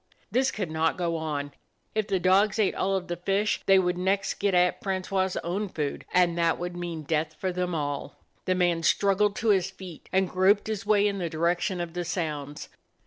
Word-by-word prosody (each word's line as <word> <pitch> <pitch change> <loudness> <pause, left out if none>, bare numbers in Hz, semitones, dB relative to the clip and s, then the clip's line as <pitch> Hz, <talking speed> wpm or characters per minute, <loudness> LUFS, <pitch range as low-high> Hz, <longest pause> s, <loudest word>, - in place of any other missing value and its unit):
This 260 +2 +2
could 190 -6 -4
not 160 +2 +1
go 170 -2 -1
on. 150 -3 -3 0.4
If 215 -1 -1
the 195 -3 +1
dogs 195 +3 +3
ate 215 -3 +2
all 195 +1 0
of 185 -1 -3
the 175 - -3
fish 195 +4 0
they 195 0 +7
would 180 -1 +1
next 195 +1 0
get 200 -2 +1
at 180 0 +3
Francois's 190 -1 -1
own 195 +4 -2
food, 150 -4 -4
and 180 -2 +3
that 170 -1 +2
would 175 0 -5
mean 170 -3 -5
death 155 +1 -1
for 185 +2 -2
them 180 -1 -2
all. 145 -2 -3 0.3
The 185 - +1
man 175 -2 +2
struggled 200 +5 +2
to 230 -2 -1
his 190 -2 +3
feet, 185 -4 -11
and 190 0 +2
groped 190 +3 +3
his 215 -2 -4
way 210 -1 +4
in 200 -1 -2
the 170 -2 -2
direction 175 +3 0
of 170 -1 -4
the 180 0 -2
sounds. 150 -4 -4
180 Hz, 205 wpm, -27 LUFS, 170-195 Hz, 0.4 s, they